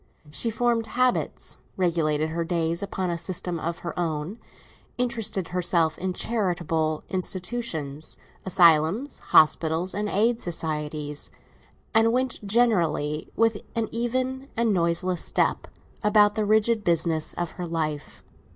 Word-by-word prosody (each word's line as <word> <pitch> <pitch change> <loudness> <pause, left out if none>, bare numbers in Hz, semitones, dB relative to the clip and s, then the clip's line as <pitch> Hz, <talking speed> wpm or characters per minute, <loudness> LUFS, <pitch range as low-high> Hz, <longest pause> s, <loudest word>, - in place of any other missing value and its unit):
She 230 +9 +1
formed 230 0 +1
habits, 250 +3 0 0.2
regulated 160 -4 +1
her 165 +1 -2
days 165 0 -1
upon 190 -2 -2
a 170 - -2
system 180 0 -2
of 165 +1 -3
her 170 - -3
own, 165 +5 -2 0.6
interested 225 -7 -2
herself 170 -3 +1
in 185 +1 -1
charitable 175 -8 -1
institutions, 180 -6 -3 0.3
asylums, 180 - +3
hospitals, 160 +3 +3
and 210 +1 -2
aid 225 +4 +2
societies; 150 -3 -3 0.6
and 225 0 +5
went 255 -2 0
generally, 180 -9 +1
with 225 -2 +2
an 225 -2 -1
even 255 +3 -2
and 230 -2 +2
noiseless 175 0 +1
step, - - 0 0.3
about 210 -1 +5
the 215 0 0
rigid 220 +1 +3
business 165 -2 +1
of 175 -2 -3
her 180 -1 -6
life. 155 -3 -3
180 Hz, 125 wpm, -25 LUFS, 160-225 Hz, 0.6 s, and